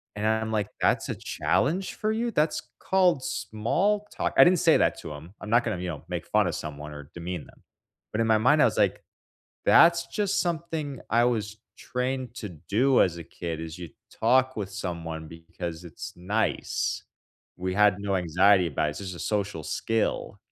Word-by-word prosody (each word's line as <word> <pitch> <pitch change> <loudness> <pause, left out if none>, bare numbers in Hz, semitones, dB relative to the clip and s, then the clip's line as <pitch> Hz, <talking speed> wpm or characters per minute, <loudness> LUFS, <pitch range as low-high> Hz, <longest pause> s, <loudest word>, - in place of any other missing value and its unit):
And 105 +1 -3
I'm 110 0 +1
like, 105 -2 0
"That's - - +2
a - - -2
challenge 180 +7 0
for 215 -1 -1
you? 230 +2 -1
That's 155 -5 +1 0.2
called 180 -7 +2
small 195 - 0
talk." - - -1
I - - +10
didn't 180 0 +5
say - - +5
that - - +1
to - - -8
him, 75 +5 -10
I'm 110 - -7
not 120 +2 +4
gonna, 90 - -2
you 90 - -4
know, 80 -4 -6
make - - -4
fun - - +3
of - - -2
someone 75 0 -6
or 75 -1 -10
demean 85 -1 -5
them, - - -19 0.5
but 110 - 0
in 115 - +1
my 110 -1 +5
mind 145 +8 +4
I - - +7
was - - 0
like, - - +2 0.6
"That's 170 0 +6
just 205 -2 0
something 160 -5 -3
I 115 +1 +4
was 110 -3 -1 0.2
trained 125 0 -3
to 105 - -5
do 105 - +2
as 85 -2 0
a 85 - -7
kid 85 0 -5
is 80 0 -7
you 85 -2 -7 0.2
talk 130 +3 +2
with 100 -3 -4
someone 85 -5 -5
because 85 +1 -7
it's 80 - -8
nice." 100 +6 -1 0.5
We 90 0 -3
had 105 -1 +4
no 100 -1 -1
anxiety 90 +2 +4
about 75 0 0
it, - - -1
it's 75 - -8
just 95 -3 -6
a - - -9
social 100 -6 -2
skill. 115 +6 -1
105 Hz, 195 wpm, -27 LUFS, 85-130 Hz, 0.6 s, I